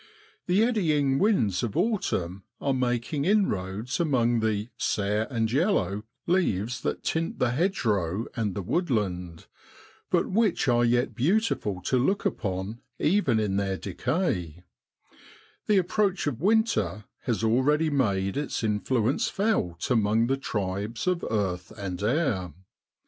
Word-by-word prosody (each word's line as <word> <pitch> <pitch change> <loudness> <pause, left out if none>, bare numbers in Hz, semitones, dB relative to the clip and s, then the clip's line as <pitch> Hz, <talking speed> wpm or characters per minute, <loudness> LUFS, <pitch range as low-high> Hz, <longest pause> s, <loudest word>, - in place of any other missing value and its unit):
The 185 +4 +4
eddying 155 - +2
winds 120 - +2
of 120 +4 -3
autumn 130 - 0 0.2
are 140 - 0
making 125 +3 -1
inroads 120 - 0
among 120 -8 +2
the 110 0 -1
* - - -52
sere 105 +2 0
and 115 -4 -1
yellow' 130 - +1 0.2
leaves 125 - 0
that - - -3
tint 165 +1 -1
the 125 - +1
hedge 175 +5 0
row 100 0 0
and 105 -5 -1
the 100 - -3
woodland, 95 - -1 0.6
but - - +2
which 210 -7 +1
are 120 -1 +4
yet 120 +1 +2
beautiful 130 - 0
to 130 +6 +1
look 195 +11 +1
upon 95 +2 -2 0.2
even 150 - +2
in 100 -2 0
their 95 -1 -1
decay; 95 - -2 1.0
the 210 - +4
approach 195 +1 +1
of 145 -5 -2
winter 180 - +1 0.2
has 115 -2 -1
already 145 +8 +2
made 100 -8 0
its 145 -4 -2
influence 110 +3 +1
felt 195 - -1
among 110 -1 +3
the 135 +3 +1
tribes 105 -3 -3
of 180 -2 0
earth 95 -4 -2
and 95 -3 -5
air. 105 - 0
120 Hz, 135 wpm, -27 LUFS, 100-160 Hz, 1.0 s, The